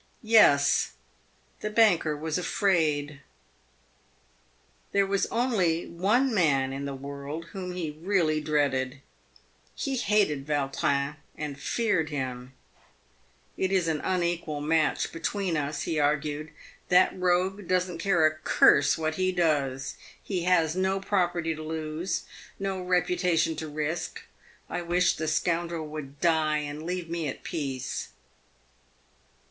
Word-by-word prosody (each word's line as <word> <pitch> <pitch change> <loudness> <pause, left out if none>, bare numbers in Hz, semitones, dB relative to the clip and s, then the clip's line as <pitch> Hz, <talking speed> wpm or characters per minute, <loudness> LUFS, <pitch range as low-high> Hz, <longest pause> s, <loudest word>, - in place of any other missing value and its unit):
Yes, 180 -11 +5 0.7
the 215 - -3
banker 195 -9 +3
was 160 +2 -2
afraid. 150 -7 0 1.7
There 200 0 +4
was 195 0 0
only 195 -9 +1
one 220 +10 +1
man 135 -8 +2
in 140 +1 -4
the 140 -1 -4
world 140 +4 -6
whom 185 -2 -5
he 165 -4 -3
really 160 -1 0
dreaded. 140 -3 0 0.7
He 270 -2 -2
hated 195 - +1
Yautrin 140 0 0 0.2
and 145 -2 -5
feared 205 -10 0
him. 130 -3 -4 0.5
" 60 +1 -36
It 190 - -1
is 185 -3 +2
an 155 -2 0
unequal 170 -4 -1
match 155 0 +1
between 180 +1 -2
us," 150 0 -2
he 160 -2 -1
argued; 150 +1 0 0.2
" - - -29
that 180 0 +5
rogue 185 +1 0
doesn't 180 -1 0
care 175 -4 +3
a 155 - +3
curse 145 -2 +4
what 155 0 -2
he 185 0 +2
does. 145 -7 0 0.3
He 180 -4 -2
has 170 -3 +3
no 190 +1 +1
property 175 -4 0
to 155 - -8
lose; 160 +3 -3 0.3
no 195 -1 -3
reputation 180 -2 +1
to 160 - -4
risk. 155 +3 -3 0.4
I 175 - -3
wish 175 +1 +2
the 155 - -3
scoundrel 170 +1 0
would 145 -2 -8
die 160 -2 +2
and 150 0 -4
leave 180 -1 -3
me 165 -2 -3
at 135 - -6
peace." 135 -5 -4
160 Hz, 130 wpm, -27 LUFS, 150-180 Hz, 1.7 s, Yes